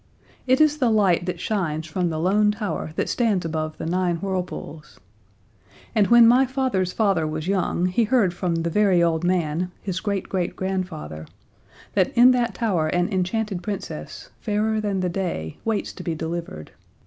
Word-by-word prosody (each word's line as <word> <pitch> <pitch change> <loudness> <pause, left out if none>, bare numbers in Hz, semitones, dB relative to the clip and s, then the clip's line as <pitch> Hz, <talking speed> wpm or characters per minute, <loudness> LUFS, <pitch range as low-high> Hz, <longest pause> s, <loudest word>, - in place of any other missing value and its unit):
It 260 +1 +4
is 305 -1 +4
the 250 -4 +3
light 195 -5 +2
that 180 - -3
shines 165 -7 -2
from 175 +2 -1
the 160 - -3
Lone 200 +6 +3
Tower 210 -6 -3
that - - -1
stands 215 -8 +1
above 155 -1 -3
the - - -5
Nine 175 +1 0
Whirlpools. 180 -4 -5 0.9
And 210 -4 +3
when 235 -1 +7
my 255 +3 +5
father's 250 -9 0
father 195 -8 +1
was 155 +1 -4
young 185 -2 0
he 185 +6 +2
heard 215 -6 +2
from 175 -1 -1
the 165 0 -1
very 190 -3 +3
old 165 -1 +1
man, 175 -1 0
his 185 -2 -3
great 200 -1 -2
great 180 -3 -2
grandfather, 180 - -4 0.7
that 190 -3 +2
in 245 +2 +8
that 240 -5 0
tower 185 -9 0
an 175 +5 0
enchanted 190 +1 -1
Princess, 200 +2 -6
fairer 215 0 0
than 200 -3 -1
the 180 - 0
day, 170 - -4
waits 220 -2 -1
to - - -9
be 170 -2 -3
delivered. 160 - -5
185 Hz, 170 wpm, -23 LUFS, 170-215 Hz, 0.9 s, in